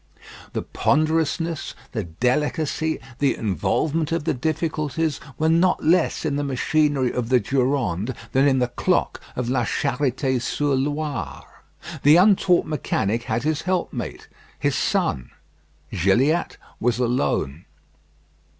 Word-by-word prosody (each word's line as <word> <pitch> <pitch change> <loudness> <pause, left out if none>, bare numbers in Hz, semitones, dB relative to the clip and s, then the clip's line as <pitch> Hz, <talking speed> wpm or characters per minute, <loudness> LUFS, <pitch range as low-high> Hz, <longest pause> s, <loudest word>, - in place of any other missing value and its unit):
The - - -2
ponderousness, 160 +2 0 0.2
the 110 -6 -3
delicacy, 150 - 0 0.2
the 140 -2 +2
involvement 145 - -1
of 165 -1 0
the 165 - 0
difficulties 155 +1 -1 0.2
were 160 - +1
not 170 +3 +3
less 170 0 +2
in 145 -2 0
the 145 - -1
machinery 140 -1 +1
of 120 -2 -2
the 130 -1 +5
Durande 125 -3 0 0.2
than 135 +2 +4
in 135 -2 +3
the 125 -1 +1
clock 120 - 0
of 125 -1 -2
La 125 -1 +1
Charité 130 +1 0
sur 145 +3 0
Loire. 140 - -3 0.4
The 145 +2 +6
untaught 185 -1 +4
mechanic 115 -7 -1
had 115 +2 -1
his 155 -1 0
helpmate 170 - -3 0.3
his - - 0
son; - - 0 0.6
Gilliatt 125 - +2 0.2
was 120 -1 +1
alone. 115 - -1
140 Hz, 125 wpm, -23 LUFS, 120-155 Hz, 0.6 s, The